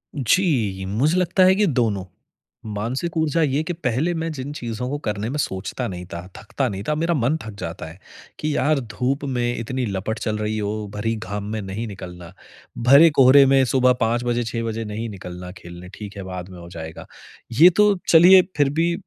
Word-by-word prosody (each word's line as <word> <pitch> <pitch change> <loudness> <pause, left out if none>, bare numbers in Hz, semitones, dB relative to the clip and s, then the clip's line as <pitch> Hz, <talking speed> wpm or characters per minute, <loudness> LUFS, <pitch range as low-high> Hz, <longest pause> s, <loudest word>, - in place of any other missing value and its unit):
जी, 125 - +1
मुझे 135 - +1
लगता 180 +1 +2
है 185 - +6
कि 210 - +3
दोनों। 115 - 0 0.7
मानसिक 130 +11 -3
ऊर्जा 160 +1 +1
ये 145 -1 +1
कि 175 - -3
पहले 160 +1 -1
मैं 165 0 -3
जिन 140 -1 -6
चीज़ों 120 -2 -5
को 145 - -2
करने 105 +1 -2
में 145 - -3
सोचता 105 +2 -3
नहीं 90 -1 -7
था, 85 - -5 0.2
थकता 125 +4 -3
नहीं 100 -1 -5
था 150 - +1
मेरा 165 +3 0
मन 135 +4 +1
थक 110 - -8
जाता 85 - -6
है 85 +4 -14 0.4
कि, 155 -1 -1
यार 150 +2 +2
धूप 125 +4 -3
में 120 -2 -1
इतनी 125 +3 -3
लपट 105 +2 -3
चल 110 -2 -2
रही 105 0 -2
हो, 105 0 -3
भरी 115 +2 -1
घाम 105 -2 -5
में 110 - -3
नहीं 100 +4 -5
निकलना। 90 -3 -9 0.6
भरे 145 +5 +8
कोहरे 135 +1 +7
में 135 0 +4
सुबह 125 0 +3
5 115 +2 +1
बजे, 120 0 0
6 115 0 -3
बजे 115 0 -3
नहीं 110 +2 -4
निकलना 90 -2 -8
खेलने, 85 +1 -11
ठीक 100 -1 -9
है, 100 - -6
बाद 90 0 -7
में 90 - -11
हो 85 0 -11
जाएगा। 80 -2 -8 0.6
ये 175 - +10
तो 210 -1 +5
चलिए 180 +3 +8 0.2
फ़िर 145 -2 +3
भी 165 +4 +1
120 Hz, 200 wpm, -22 LUFS, 105-145 Hz, 0.7 s, ये